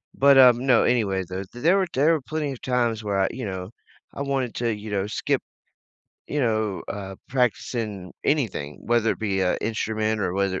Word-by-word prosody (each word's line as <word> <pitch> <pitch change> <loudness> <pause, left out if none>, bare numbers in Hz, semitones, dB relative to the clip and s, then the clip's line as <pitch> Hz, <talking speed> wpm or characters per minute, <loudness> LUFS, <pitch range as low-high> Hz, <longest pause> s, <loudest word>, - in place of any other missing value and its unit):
but, 140 0 +6
um, 125 -2 +8
no, 130 -4 +5
anyway, 100 -6 +1
though, 95 +1 -4
there 120 - -9
there 175 +5 +5
were 190 -2 +1
there 150 +5 +4
were 160 - 0
plenty 150 +1 -3
of 125 - -11
times 120 -3 0
where 100 -2 -1
I, 95 - +3
you 130 - -6
know, 95 -2 -5 0.5
I 140 - -3
wanted 135 -4 -2
to, 115 -2 0
you 105 +1 -8
know, 100 -1 -1
skip, 105 - -1 0.9
you 150 - -2
know, 110 -5 0
uh, 95 -1 -5 0.2
practicing 115 -6 -1
anything, 110 - -1
whether 115 -1 +2
it - - -9
be 100 -3 -1
a 90 -1 +2
instrument 110 0 -1
or 90 -3 -1
whether 95 -1 0
110 Hz, 200 wpm, -24 LUFS, 100-130 Hz, 0.9 s, um